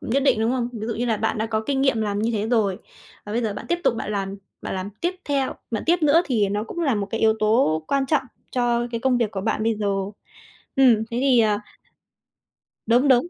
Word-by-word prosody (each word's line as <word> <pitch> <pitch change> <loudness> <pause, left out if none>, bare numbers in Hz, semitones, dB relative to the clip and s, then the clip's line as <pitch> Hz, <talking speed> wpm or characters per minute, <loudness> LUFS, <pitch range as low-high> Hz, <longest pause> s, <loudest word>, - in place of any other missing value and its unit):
nhất 265 +5 0
định, 255 -5 +3
đúng 225 +1 +2
không? 245 -2 -1
Ví 220 -1 -5
dụ 230 - -2
như 240 - -2
là 225 -2 +1
bạn 220 +1 -1
đã 220 - 0
có 220 -1 -1
kinh 275 -1 0
nghiệm 270 -5 +2
làm 205 -1 -1
như 220 +2 0
thế 215 0 -1
rồi, 210 -6 +1 0.5
và 205 - -6
bây 235 +2 0
giờ 215 -3 -1
bạn - - -7
tiếp 345 +1 +1
tục - - +3
bạn 210 - -4
làm 195 -1 -2 0.3
bạn - - -4
làm 185 +2 -4
tiếp 350 +2 0
theo 275 -2 0 0.2
bạn 220 - -2
tiếp 345 0 +3
nữa 310 +3 +5
thì 215 -7 +1
nó 205 +2 -1
cũng 290 - -8
là 285 -7 +2
một 205 -2 -2
cái 225 - -2
yếu 220 0 +4
tố 215 -8 +2
quan 275 -1 +1
trọng 310 +1 +2 0.3
cho 240 -1 +1
cái 230 -1 -3
công 255 0 +2
việc 230 -4 0
của 195 - -4
bạn 215 +1 -1
bây 225 0 +2
giờ. 210 -1 -3 0.9
Ừm, 260 -3 +6 0.2
thế 235 - -2
thì, 265 -3 +4
ờ 210 -2 +3 1.3
Đúng, 245 +5 +4
đúng, 255 +2 +5
230 Hz, 255 wpm, -23 LUFS, 215-260 Hz, 1.3 s, Ừm